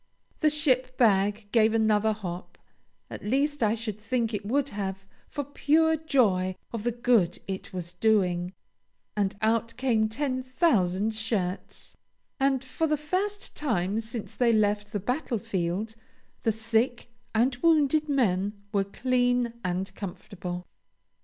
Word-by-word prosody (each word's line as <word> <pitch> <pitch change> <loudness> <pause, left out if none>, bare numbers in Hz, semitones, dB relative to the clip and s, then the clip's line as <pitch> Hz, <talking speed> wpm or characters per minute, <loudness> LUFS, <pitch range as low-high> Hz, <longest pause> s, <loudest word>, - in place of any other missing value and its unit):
The 310 - +4
ship 260 -4 +1
bag 205 -2 +3
gave 225 -1 +4
another 220 -1 +3
hop 185 -4 -6 0.5
(at - - -7
least 280 +6 0
I 215 0 +3
should 215 -2 -5
think 230 +1 -1
it 205 -1 -2
would 275 +7 0
have, 195 -2 -4 0.2
for 285 - -4
pure 310 +3 +2
joy 210 -12 +2 0.2
of 230 - -3
the 240 - +1
good 230 -7 +2
it 190 -1 -5
was 175 -2 -5
doing), 180 -3 +2 0.6
and 200 -1 0
out 230 +1 +1
came 230 -4 +2
ten 255 +2 -1
thousand 220 - +1
shirts; 215 -4 -3 0.4
and 270 -1 +2
for 295 +5 -1
the 305 0 +1
first 385 +7 -2
time 215 -8 0
since 225 0 -6
they 240 -2 +3
left 210 -1 +1
the 205 - -1
battlefield 220 - -2 0.5
the 225 - +2
sick 225 +2 0 0.2
and 245 +3 +2
wounded 305 0 +3
men 205 -8 +1 0.2
were 200 -1 +2
clean 245 +2 +1
and 180 +2 -2
comfortable. 180 -2 -6
225 Hz, 135 wpm, -27 LUFS, 200-255 Hz, 0.6 s, The